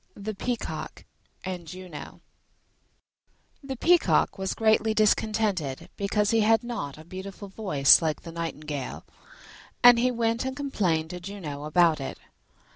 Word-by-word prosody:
THE 210 Hz, +2 st, -5 dB
PEACOCK 240 Hz, +4 st, -5 dB, 0.4 s
AND 180 Hz, -3 st, -5 dB
JUNO 180 Hz, -3 st, -9 dB, 1.4 s
The 270 Hz, -1 st, -5 dB
Peacock 340 Hz, -, +3 dB
was 190 Hz, 0 st, -2 dB
greatly 220 Hz, 0 st, +2 dB
discontented 210 Hz, -9 st, +1 dB
because 205 Hz, +1 st, 0 dB
he 225 Hz, -, +3 dB
had 225 Hz, +2 st, +3 dB
not 220 Hz, -, -5 dB
a 155 Hz, -, -13 dB
beautiful 190 Hz, +3 st, -8 dB
voice 150 Hz, -, +5 dB
like 155 Hz, -2 st, -2 dB
the 165 Hz, -, -8 dB
nightingale, 155 Hz, -5 st, -5 dB, 0.8 s
and 245 Hz, -1 st, +9 dB
he 250 Hz, +2 st, +3 dB
went 230 Hz, -1 st, 0 dB
and 265 Hz, +1 st, -4 dB
complained 180 Hz, -, -1 dB
to 180 Hz, -, -6 dB
Juno 175 Hz, -6 st, -7 dB
about 160 Hz, 0 st, +3 dB
it. 135 Hz, -, -5 dB
195 Hz, 130 wpm, -26 LUFS, 160-225 Hz, 1.4 s, and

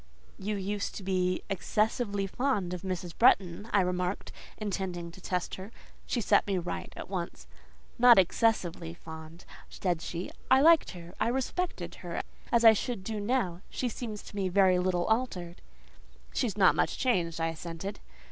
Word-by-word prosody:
"You 205 Hz, +2 st, -2 dB
used 200 Hz, +1 st, -3 dB
to 200 Hz, -, -6 dB
be 185 Hz, -1 st, 0 dB
excessively 205 Hz, +1 st, 0 dB
fond 200 Hz, -4 st, -1 dB
of 180 Hz, -, -4 dB
Mrs. 180 Hz, -3 st, -4 dB
Bretton," 205 Hz, -4 st, +3 dB
I 200 Hz, -, +4 dB
remarked, 180 Hz, +1 st, -2 dB, 0.3 s
intending 185 Hz, -5 st, -3 dB
to 185 Hz, -, -14 dB
test 180 Hz, -1 st, -2 dB
her. 200 Hz, +4 st, -9 dB, 0.4 s
She 240 Hz, -, 0 dB
set -, -, +3 dB
me 195 Hz, -2 st, +1 dB
right 175 Hz, 0 st, -4 dB
at -, -, -6 dB
once. 180 Hz, -3 st, -5 dB, 0.5 s
"Not 245 Hz, -1 st, +8 dB
excessively 175 Hz, -4 st, +1 dB
fond," 160 Hz, 0 st, -10 dB, 0.2 s
said 175 Hz, -4 st, -1 dB
she; 170 Hz, +2 st, -5 dB, 0.2 s
"I 260 Hz, -, +7 dB
liked 325 Hz, +1 st, +6 dB
her: 170 Hz, 0 st, -11 dB
I -, -, +2 dB
respected 265 Hz, +9 st, -2 dB
her -, -, -4 dB, 0.3 s
as 235 Hz, -1 st, +4 dB
I 225 Hz, -, +10 dB
should 220 Hz, -2 st, -3 dB
do 215 Hz, +1 st, -3 dB
now: 205 Hz, -6 st, 0 dB
she 250 Hz, -, -2 dB
seems 220 Hz, -2 st, -6 dB
to -, -, -12 dB
me 195 Hz, -2 st, 0 dB
very 185 Hz, -1 st, +4 dB
little 180 Hz, -1 st, +1 dB
altered." 195 Hz, -7 st, -1 dB, 0.7 s
"She 250 Hz, -, +1 dB
is 205 Hz, -, -5 dB
not 190 Hz, -2 st, +6 dB
much -, -, 0 dB
changed," 175 Hz, -10 st, +1 dB
I 165 Hz, 0 st, +1 dB
assented. 165 Hz, +4 st, -6 dB
190 Hz, 165 wpm, -30 LUFS, 175-220 Hz, 0.7 s, I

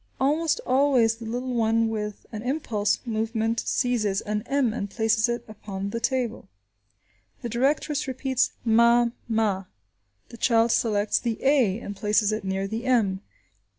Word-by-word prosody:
Almost 310 Hz, +4 st, +1 dB
always 255 Hz, -4 st, +3 dB
the 230 Hz, -1 st, -8 dB
little 250 Hz, +2 st, -3 dB
one 225 Hz, -1 st, +2 dB
with 210 Hz, -2 st, -4 dB
an 215 Hz, -, -5 dB
impulsive 235 Hz, -5 st, -1 dB
movement 225 Hz, 0 st, -1 dB
seizes 220 Hz, -6 st, 0 dB
an 210 Hz, 0 st, -2 dB
m 275 Hz, -5 st, +1 dB
and 200 Hz, -3 st, -4 dB
places 220 Hz, +2 st, +1 dB
it 240 Hz, 0 st, -3 dB
upon 200 Hz, -2 st, -6 dB
the 230 Hz, -, -3 dB
table. 245 Hz, -, -2 dB, 1.0 s
The 240 Hz, -, -3 dB
directress 280 Hz, +5 st, 0 dB
repeats 260 Hz, 0 st, 0 dB
"ma–ma." 230 Hz, -3 st, +2 dB, 0.6 s
The 235 Hz, -, -11 dB
child 230 Hz, 0 st, +3 dB
selects 210 Hz, -3 st, +1 dB
the 230 Hz, -3 st, -2 dB
a 260 Hz, -9 st, +3 dB
and 205 Hz, -, -6 dB
places 210 Hz, +1 st, +2 dB
it 215 Hz, -1 st, -3 dB
near 190 Hz, 0 st, -2 dB
the 225 Hz, +4 st, -4 dB
m. 210 Hz, -7 st, +2 dB
225 Hz, 145 wpm, -25 LUFS, 210-250 Hz, 1.0 s, always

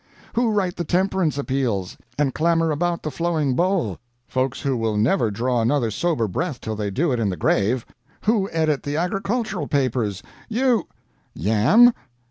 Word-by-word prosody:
Who 235 Hz, 0 st, +2 dB
write 195 Hz, -4 st, 0 dB
the 175 Hz, -, -1 dB
temperance 180 Hz, -2 st, +1 dB
appeals, 130 Hz, -9 st, -1 dB, 0.2 s
and 140 Hz, -3 st, +1 dB
clamor 165 Hz, 0 st, +2 dB
about 170 Hz, +3 st, -1 dB
the 155 Hz, -, -3 dB
flowing 160 Hz, -5 st, 0 dB
bowl? 175 Hz, -, 0 dB, 0.3 s
Folks 130 Hz, 0 st, -1 dB
who 140 Hz, -2 st, 0 dB
will 110 Hz, -3 st, -1 dB
never 115 Hz, -, +2 dB
draw 120 Hz, +3 st, 0 dB
another 120 Hz, -1 st, +1 dB
sober 150 Hz, -3 st, 0 dB
breath 145 Hz, -, -3 dB
till 110 Hz, -1 st, -4 dB
they 105 Hz, -1 st, -2 dB
do 145 Hz, -, 0 dB
it 125 Hz, -, 0 dB
in 110 Hz, -3 st, +1 dB
the 90 Hz, -, -3 dB
grave. 110 Hz, +4 st, +1 dB, 0.4 s
Who 210 Hz, -3 st, +1 dB
edit 155 Hz, -3 st, +1 dB
the 145 Hz, +1 st, -3 dB
agricultural 195 Hz, +4 st, -1 dB
papers, 125 Hz, -, 0 dB, 0.3 s
you 245 Hz, 0 st, +1 dB, 0.5 s
yam? 115 Hz, -, +5 dB
145 Hz, 160 wpm, -22 LUFS, 115-175 Hz, 0.5 s, yam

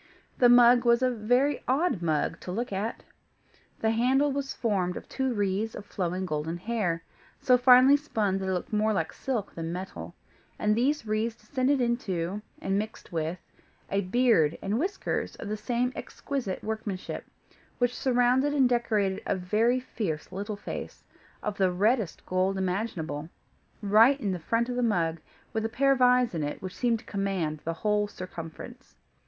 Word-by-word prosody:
The 245 Hz, -, +6 dB
mug 245 Hz, 0 st, +7 dB
was 235 Hz, +1 st, +4 dB
a 255 Hz, -, +3 dB
very 245 Hz, +5 st, +1 dB
odd 270 Hz, -, +1 dB
mug 165 Hz, 0 st, 0 dB
to 180 Hz, -, -7 dB
look 230 Hz, +2 st, -3 dB
at. 205 Hz, +4 st, -3 dB, 0.8 s
The 220 Hz, -, +2 dB
handle 260 Hz, +5 st, +2 dB
was 275 Hz, 0 st, -3 dB
formed 190 Hz, -6 st, -1 dB
of -, -, -9 dB
two 265 Hz, -1 st, -1 dB
wreaths 205 Hz, 0 st, -1 dB
of 200 Hz, -, -8 dB
flowing 185 Hz, -1 st, -2 dB
golden 160 Hz, 0 st, -3 dB
hair, 180 Hz, -5 st, -2 dB, 0.4 s
so 250 Hz, -, +4 dB
finely 255 Hz, +2 st, +7 dB
spun 215 Hz, -10 st, -1 dB
that 190 Hz, 0 st, -3 dB
it -, -, +1 dB
looked 185 Hz, +4 st, -3 dB
more 215 Hz, +1 st, +2 dB
like 165 Hz, -5 st, -1 dB
silk 235 Hz, -7 st, -3 dB
than 165 Hz, 0 st, -4 dB
metal, 185 Hz, +2 st, -6 dB, 0.4 s
and 210 Hz, 0 st, +2 dB
these 265 Hz, +3 st, +1 dB
wreaths 220 Hz, +2 st, -1 dB
descended 255 Hz, +4 st, 0 dB
into, 205 Hz, -6 st, -1 dB, 0.2 s
and 195 Hz, +1 st, 0 dB
mixed 215 Hz, +1 st, -7 dB
with, 165 Hz, +1 st, -2 dB, 0.5 s
a 195 Hz, +1 st, +2 dB
beard 185 Hz, -6 st, +3 dB
and 205 Hz, +4 st, -1 dB
whiskers 375 Hz, +6 st, -2 dB
of -, -, -8 dB
the 215 Hz, -, -1 dB
same 245 Hz, +3 st, -1 dB
exquisite 255 Hz, -10 st, -4 dB
workmanship, 215 Hz, -3 st, -4 dB, 0.5 s
which 245 Hz, 0 st, +1 dB
surrounded 255 Hz, +3 st, +2 dB
and 270 Hz, -3 st, +5 dB
decorated 215 Hz, -5 st, +1 dB
a -, -, +1 dB
very 215 Hz, +7 st, +1 dB
fierce 190 Hz, -12 st, -4 dB
little 200 Hz, +2 st, -4 dB
face, 205 Hz, -, -7 dB, 0.4 s
of 210 Hz, -1 st, -3 dB
the 190 Hz, -2 st, +3 dB
reddest 210 Hz, +1 st, 0 dB
gold 185 Hz, +1 st, 0 dB
imaginable, 180 Hz, -6 st, -3 dB, 0.5 s
right 225 Hz, +7 st, +5 dB
in 205 Hz, -7 st, -1 dB
the 180 Hz, -, -3 dB
front 230 Hz, +8 st, 0 dB
of 250 Hz, -, -3 dB
the 250 Hz, -, 0 dB
mug, 170 Hz, -8 st, +1 dB, 0.3 s
with 220 Hz, -, -1 dB
a 225 Hz, -, -1 dB
pair 275 Hz, +4 st, +2 dB
of 265 Hz, -2 st, +1 dB
eyes 250 Hz, -2 st, +4 dB
in 165 Hz, -, -2 dB
it 145 Hz, 0 st, -3 dB
which 185 Hz, -1 st, -7 dB
seemed 240 Hz, -2 st, +1 dB
to -, -, -16 dB
command 190 Hz, -7 st, -2 dB
its 165 Hz, 0 st, -2 dB
whole 210 Hz, -1 st, +2 dB
circumference. 185 Hz, +7 st, -9 dB
215 Hz, 170 wpm, -28 LUFS, 185-245 Hz, 0.8 s, mug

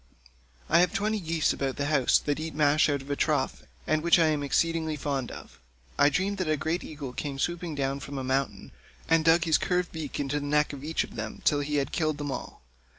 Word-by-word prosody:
I 165 Hz, -, +5 dB
have 180 Hz, -, +3 dB
twenty 215 Hz, +2 st, 0 dB
geese 165 Hz, -3 st, +1 dB
about 135 Hz, -1 st, -2 dB
the 140 Hz, -, -2 dB
house 145 Hz, -4 st, +3 dB
that 145 Hz, 0 st, -2 dB
eat 160 Hz, 0 st, -5 dB
mash 150 Hz, 0 st, +4 dB
out 140 Hz, -2 st, -1 dB
of 140 Hz, -, -7 dB
a -, -, +1 dB
trough,155 145 Hz, -3 st, -1 dB, 0.2 s
and 155 Hz, -, +2 dB
of -, -, -9 dB
which 170 Hz, -, +5 dB
I 165 Hz, -2 st, +4 dB
am 150 Hz, -2 st, 0 dB
exceedingly 160 Hz, +2 st, 0 dB
fond. 140 Hz, -3 st, -3 dB, 0.7 s
I 145 Hz, -, +6 dB
dreamed 195 Hz, +6 st, -1 dB
that 180 Hz, -4 st, -1 dB
a 155 Hz, -, +2 dB
great 160 Hz, +4 st, -2 dB
eagle 145 Hz, -4 st, -7 dB
came 140 Hz, +1 st, -4 dB
swooping 170 Hz, +2 st, -2 dB
down 135 Hz, 0 st, -1 dB
from 140 Hz, 0 st, -7 dB
a 135 Hz, -, -3 dB
mountain, 130 Hz, -6 st, -2 dB, 0.4 s
and 165 Hz, -1 st, +3 dB
dug 165 Hz, +1 st, +5 dB
his 160 Hz, -3 st, +3 dB
curved 180 Hz, -1 st, 0 dB
beak 155 Hz, -4 st, -5 dB
into 145 Hz, +1 st, -1 dB
the 145 Hz, -, -5 dB
neck 150 Hz, 0 st, +2 dB
of 140 Hz, -1 st, -8 dB
each 160 Hz, +2 st, 0 dB
of -, -, -11 dB
them 110 Hz, -1 st, -6 dB
till 145 Hz, -, +4 dB
he 145 Hz, +1 st, -2 dB
had 140 Hz, -2 st, 0 dB
killed 155 Hz, -3 st, 0 dB
them 145 Hz, -1 st, -4 dB
all. -, -, -7 dB
150 Hz, 235 wpm, -28 LUFS, 140-165 Hz, 0.7 s, I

